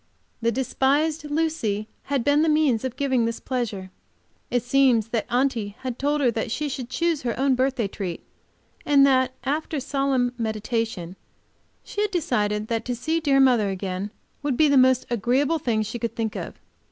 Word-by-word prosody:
The 230 Hz, 0 st, +2 dB
despised 285 Hz, +5 st, +1 dB
Lucy 290 Hz, -10 st, -1 dB, 0.2 s
had 275 Hz, -3 st, 0 dB
been 290 Hz, +3 st, +3 dB
the 320 Hz, -, +3 dB
means 300 Hz, -7 st, +2 dB
of 260 Hz, -2 st, -3 dB
giving 270 Hz, -3 st, +1 dB
me -, -, +2 dB
this 230 Hz, -, -3 dB
pleasure. 210 Hz, -7 st, -3 dB, 0.6 s
It 245 Hz, -2 st, 0 dB
seems 245 Hz, -3 st, +3 dB
that 225 Hz, -2 st, -1 dB
Aunty 240 Hz, -5 st, 0 dB
had 255 Hz, -2 st, -5 dB
told 290 Hz, +2 st, +1 dB
her 235 Hz, -4 st, +1 dB
she 295 Hz, +6 st, -2 dB
should 255 Hz, -3 st, -5 dB
choose 335 Hz, +1 st, 0 dB
her 240 Hz, -2 st, -2 dB
own 270 Hz, 0 st, +3 dB
birthday 255 Hz, -3 st, +1 dB
treat, 185 Hz, -3 st, -5 dB, 0.6 s
and 280 Hz, -1 st, +5 dB
that, 260 Hz, -1 st, +3 dB
after 305 Hz, +2 st, -2 dB
solemn 270 Hz, -2 st, 0 dB
meditation, 220 Hz, -5 st, -3 dB, 0.7 s
she 410 Hz, -, -4 dB
had 420 Hz, -, +1 dB
decided 215 Hz, -, 0 dB
that 230 Hz, 0 st, -1 dB
to 245 Hz, -, -2 dB
see 315 Hz, +7 st, -1 dB
dear 280 Hz, -4 st, +3 dB
mother 245 Hz, -6 st, +4 dB
again 190 Hz, +1 st, -3 dB, 0.3 s
would 285 Hz, -4 st, -1 dB
be 310 Hz, -, +5 dB
the 285 Hz, -, +3 dB
most 260 Hz, -1 st, +5 dB
agreeable 260 Hz, +8 st, +1 dB
thing 225 Hz, -5 st, 0 dB
she 220 Hz, +3 st, -5 dB
could 230 Hz, -2 st, -3 dB
think 225 Hz, -2 st, -2 dB
of. -, -, -5 dB
255 Hz, 175 wpm, -24 LUFS, 225-280 Hz, 0.7 s, and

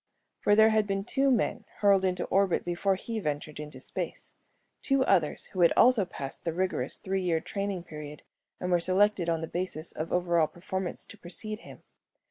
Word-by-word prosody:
For 205 Hz, -, +4 dB
there 220 Hz, +1 st, +6 dB
had 215 Hz, -1 st, +2 dB
been 195 Hz, -1 st, -1 dB
two 275 Hz, +3 st, +2 dB
men 235 Hz, -2 st, +1 dB, 0.2 s
hurled 200 Hz, -2 st, +5 dB
into 180 Hz, -1 st, 0 dB
orbit 195 Hz, -2 st, +2 dB
before 175 Hz, +3 st, +1 dB
he 225 Hz, +4 st, -4 dB
ventured 150 Hz, -4 st, -3 dB
into 150 Hz, 0 st, -7 dB
space. -, -, -4 dB, 0.5 s
Two 275 Hz, -1 st, +2 dB
others 175 Hz, -10 st, +2 dB
who 185 Hz, -, -1 dB
had 170 Hz, -, +6 dB
also 240 Hz, -5 st, +6 dB
passed 140 Hz, -6 st, -7 dB
the 165 Hz, -, -1 dB
rigorous 185 Hz, +1 st, -1 dB
three 190 Hz, 0 st, -2 dB
year 170 Hz, -3 st, +1 dB
training 195 Hz, 0 st, -3 dB
period 150 Hz, -3 st, -9 dB, 0.4 s
and 180 Hz, -, -2 dB
were 175 Hz, -, +4 dB
selected 185 Hz, 0 st, +3 dB
on 165 Hz, -1 st, 0 dB
the 165 Hz, -, -3 dB
basis 175 Hz, -2 st, -4 dB
of 155 Hz, +1 st, -5 dB
over 175 Hz, -1 st, +2 dB
all 155 Hz, -, +4 dB
performance 185 Hz, +2 st, -4 dB
to -, -, -14 dB
precede 215 Hz, +5 st, -5 dB
him. -, -, -13 dB
185 Hz, 190 wpm, -29 LUFS, 170-205 Hz, 0.5 s, there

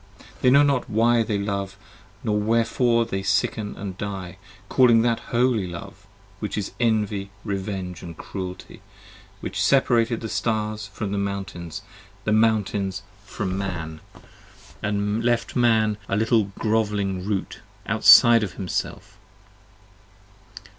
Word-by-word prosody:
They 125 Hz, -, +5 dB
know 140 Hz, +3 st, +6 dB
not 140 Hz, -3 st, +1 dB
why 115 Hz, +2 st, +3 dB
they 110 Hz, -2 st, -1 dB
love 100 Hz, -1 st, -3 dB, 0.5 s
nor 105 Hz, -2 st, +1 dB
wherefore 115 Hz, +2 st, +2 dB
they 95 Hz, -4 st, -3 dB
sicken 105 Hz, +2 st, -1 dB, 0.2 s
& -, -, -21 dB
die, 100 Hz, -2 st, -4 dB
30 -, -, -17 dB, 0.3 s
Calling 120 Hz, -3 st, +5 dB
that 120 Hz, -1 st, +1 dB
Holy 120 Hz, -5 st, +1 dB
Love, 90 Hz, +3 st, -10 dB, 0.3 s
which 105 Hz, -, -4 dB
is 105 Hz, -1 st, -3 dB
Envy 105 Hz, -4 st, 0 dB
Revenge 95 Hz, -3 st, -4 dB
& -, -, -28 dB
Cruelty, 95 Hz, +1 st, -7 dB, 0.6 s
Which 100 Hz, +3 st, -3 dB
separated 120 Hz, -2 st, +2 dB
the 115 Hz, -, -4 dB
stars 110 Hz, -1 st, -2 dB
from 100 Hz, 0 st, -5 dB
the 100 Hz, -, -1 dB
mountains: 95 Hz, -4 st, -5 dB, 0.4 s
the 110 Hz, -, -1 dB
mountains 105 Hz, -3 st, +1 dB, 0.2 s
from 95 Hz, -1 st, -3 dB
Man, 85 Hz, -5 st, -4 dB
I -, -, -16 dB
7 -, -, -22 dB, 0.6 s
D -, -, -2 dB
And 105 Hz, +2 st, -1 dB
left 120 Hz, -1 st, 0 dB
Man, 110 Hz, -3 st, +3 dB
a -, -, +1 dB
little 110 Hz, 0 st, +3 dB
grovelling 105 Hz, -4 st, 0 dB
Root, 100 Hz, -1 st, -3 dB, 0.3 s
outside 115 Hz, -1 st, +7 dB
of 105 Hz, -4 st, -3 dB
Himself. 95 Hz, -4 st, -5 dB
105 Hz, 135 wpm, -24 LUFS, 95-115 Hz, 0.6 s, outside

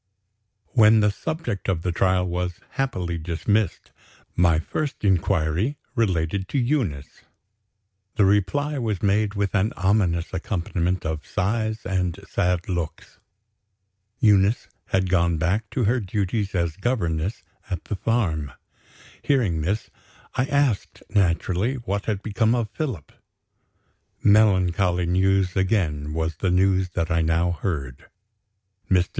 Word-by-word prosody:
When 110 Hz, -2 st, +6 dB
the 105 Hz, 0 st, +3 dB
subject 125 Hz, -, -4 dB
of 85 Hz, -4 st, -1 dB
the 90 Hz, -, 0 dB
trial 90 Hz, +1 st, +2 dB
was 90 Hz, 0 st, -3 dB
happily 95 Hz, -, -2 dB
dismissed, 95 Hz, +6 st, -1 dB, 0.4 s
my 85 Hz, -2 st, +4 dB
first 140 Hz, -, -3 dB
inquiry 95 Hz, -, +1 dB, 0.2 s
related 95 Hz, -, 0 dB
to 140 Hz, -, -2 dB
Eunice. 120 Hz, -, -1 dB, 0.9 s
The 105 Hz, -, +4 dB
reply 135 Hz, +10 st, +1 dB
was 110 Hz, -6 st, -2 dB
made 105 Hz, +1 st, +2 dB
with 100 Hz, -2 st, -1 dB
an 100 Hz, +2 st, +1 dB
ominous 95 Hz, -3 st, +1 dB
accompaniment 90 Hz, -1 st, -2 dB
of 80 Hz, -1 st, -3 dB
sighs 110 Hz, +3 st, -1 dB
and 90 Hz, -2 st, -1 dB
sad 90 Hz, -3 st, 0 dB
looks. 85 Hz, -4 st, -5 dB, 1.0 s
Eunice 105 Hz, -3 st, +3 dB, 0.2 s
had 95 Hz, -1 st, +1 dB
gone 85 Hz, -2 st, +2 dB
back 100 Hz, +7 st, 0 dB
to 125 Hz, -, -1 dB
her 120 Hz, +4 st, +2 dB
duties 100 Hz, 0 st, -2 dB
as 85 Hz, -3 st, -1 dB
governess 95 Hz, -5 st, -1 dB, 0.3 s
at 90 Hz, -4 st, -3 dB
the 105 Hz, -, -3 dB
farm. 90 Hz, -, -1 dB, 0.7 s
Hearing 110 Hz, -, +1 dB
this, 100 Hz, +8 st, -2 dB, 0.4 s
I 130 Hz, -, +1 dB
asked 140 Hz, -7 st, 0 dB
naturally 95 Hz, +4 st, +1 dB
what 100 Hz, -5 st, -3 dB
had 105 Hz, -3 st, -2 dB
become 110 Hz, +2 st, +1 dB
of 115 Hz, -4 st, -2 dB
Philip. 125 Hz, -, -4 dB, 1.1 s
Melancholy 95 Hz, -4 st, +3 dB
news, 95 Hz, +1 st, +2 dB
again, 90 Hz, -7 st, 0 dB
was 80 Hz, -1 st, -2 dB
the 95 Hz, -, 0 dB
news 95 Hz, 0 st, +2 dB
that 85 Hz, -2 st, -1 dB
I 85 Hz, 0 st, +2 dB
now 80 Hz, +2 st, +2 dB
heard. 75 Hz, -8 st, -4 dB, 0.8 s
Mr. 90 Hz, -2 st, +3 dB
95 Hz, 125 wpm, -24 LUFS, 85-110 Hz, 1.1 s, When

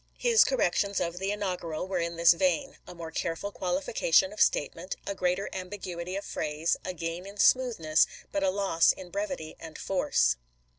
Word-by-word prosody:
His 470 Hz, -2 st, +5 dB
cor -, -, 0 dB
rections 200 Hz, -, +1 dB
of 170 Hz, +1 st, -2 dB
the 195 Hz, +1 st, -2 dB
inaugural 180 Hz, -5 st, -3 dB
were 190 Hz, -2 st, -1 dB
in 170 Hz, 0 st, -2 dB
this 170 Hz, +1 st, +6 dB
vein: 275 Hz, -, 0 dB
a 180 Hz, -, -10 dB
more 165 Hz, -1 st, -7 dB
careful 165 Hz, +5 st, -3 dB
qualification 190 Hz, -, +1 dB
of 210 Hz, -, -4 dB
statement, 165 Hz, +5 st, +1 dB
a -, -, -2 dB
greater 185 Hz, +1 st, 0 dB
ambiguity 185 Hz, -1 st, -5 dB
of 200 Hz, -, -4 dB
phrase, 155 Hz, +2 st, -1 dB
a 185 Hz, -, -4 dB
gain 165 Hz, +3 st, -4 dB
in 200 Hz, +1 st, -11 dB
smoothness, 205 Hz, -10 st, +4 dB, 0.2 s
but 200 Hz, -, -1 dB
a 190 Hz, -, +3 dB
loss 190 Hz, -4 st, +3 dB
in 180 Hz, -2 st, -11 dB
brevity 280 Hz, -, -4 dB
and 160 Hz, -1 st, -9 dB
force. 185 Hz, -, +1 dB
185 Hz, 180 wpm, -28 LUFS, 170-200 Hz, 0.2 s, this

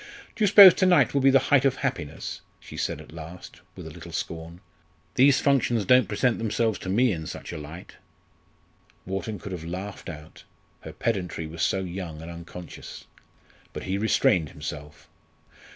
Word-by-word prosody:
"Do 215 Hz, -, -1 dB
you -, -, +5 dB
suppose 195 Hz, -2 st, +10 dB
to 185 Hz, -, +2 dB
night 180 Hz, -2 st, +4 dB
will 140 Hz, -, +2 dB
be 135 Hz, -, +5 dB
the 135 Hz, -, +6 dB, 0.2 s
height 135 Hz, -2 st, +6 dB
of 135 Hz, -2 st, +2 dB
happiness?" 130 Hz, -, -4 dB, 0.2 s
she -, -, -12 dB
said -, -, -2 dB
at -, -, -13 dB
last 80 Hz, +3 st, -11 dB
with -, -, -10 dB
a -, -, -8 dB
little -, -, -11 dB
scorn. 85 Hz, +1 st, -6 dB, 0.5 s
"These 135 Hz, +1 st, +5 dB
functions 120 Hz, -6 st, +2 dB
don't 125 Hz, +5 st, +5 dB
present 125 Hz, -3 st, 0 dB
themselves 110 Hz, 0 st, 0 dB
to 95 Hz, -, -6 dB
me 120 Hz, +5 st, +3 dB
in 80 Hz, -4 st, -4 dB
such -, -, -7 dB
a -, -, -5 dB
light." 80 Hz, +4 st, -11 dB, 1.1 s
Wharton 95 Hz, +3 st, -4 dB
could 100 Hz, +2 st, -9 dB
have 90 Hz, -3 st, -6 dB
laughed 95 Hz, +4 st, -6 dB
out 75 Hz, -1 st, -11 dB, 0.4 s
her -, -, -9 dB
pedantry 90 Hz, -7 st, -3 dB
was 80 Hz, +1 st, -7 dB
so 95 Hz, -, +1 dB
young 90 Hz, -3 st, -6 dB
and 80 Hz, +2 st, -8 dB
unconscious. 85 Hz, 0 st, -10 dB, 0.7 s
But -, -, -6 dB
he 95 Hz, +1 st, -2 dB
restrained 90 Hz, -6 st, +2 dB
himself. 75 Hz, 0 st, -8 dB
95 Hz, 175 wpm, -25 LUFS, 85-125 Hz, 1.1 s, suppose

